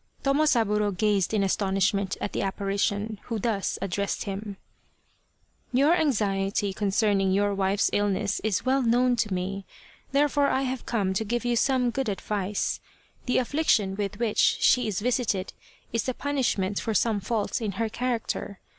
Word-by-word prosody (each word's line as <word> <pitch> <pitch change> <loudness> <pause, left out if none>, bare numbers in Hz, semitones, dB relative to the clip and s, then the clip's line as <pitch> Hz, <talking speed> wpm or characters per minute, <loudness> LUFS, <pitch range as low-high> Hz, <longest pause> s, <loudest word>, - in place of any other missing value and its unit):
Tomosaburo 225 -9 +2
gazed 205 -3 +2
in 210 -2 +1
astonishment 195 0 0
at 200 - -4
the - - -2
appari 195 0 -2
tion, 205 +1 -1
who 230 - -3
thus 210 -2 -1
addressed 200 +1 -2
him: 200 0 -5 0.5
" - - -41
Your 295 +5 +5
anxiety 205 - 0
concerning 200 -1 +1
your 205 +1 +2
wife's 195 +1 +1
illness 205 0 0
is 215 0 0
well 265 +1 +2
known 245 +1 +3
to 215 -3 0
me, 190 +2 -3 0.5
therefore 285 0 +3
I 265 - +1
have 260 -1 -4
come 200 -5 0
to 195 - 0
give 240 +3 -2
you 240 0 +1
some 250 0 +2
good 265 -2 -2
advice. 200 0 -2 0.5
The 250 - +2
affliction 245 -8 +1
with 205 0 -3
which 225 -2 -1
she 250 -2 +4
is 205 -2 -2
visited 230 -5 0 0.4
is 230 - +1
the 255 - -2
punishment 240 -9 -1
for 220 - -2
some 220 -2 +2
faults 215 +2 -2
in 210 -3 -2
her 225 +4 -1
character. 230 -4 -3
210 Hz, 160 wpm, -26 LUFS, 195-245 Hz, 0.5 s, Your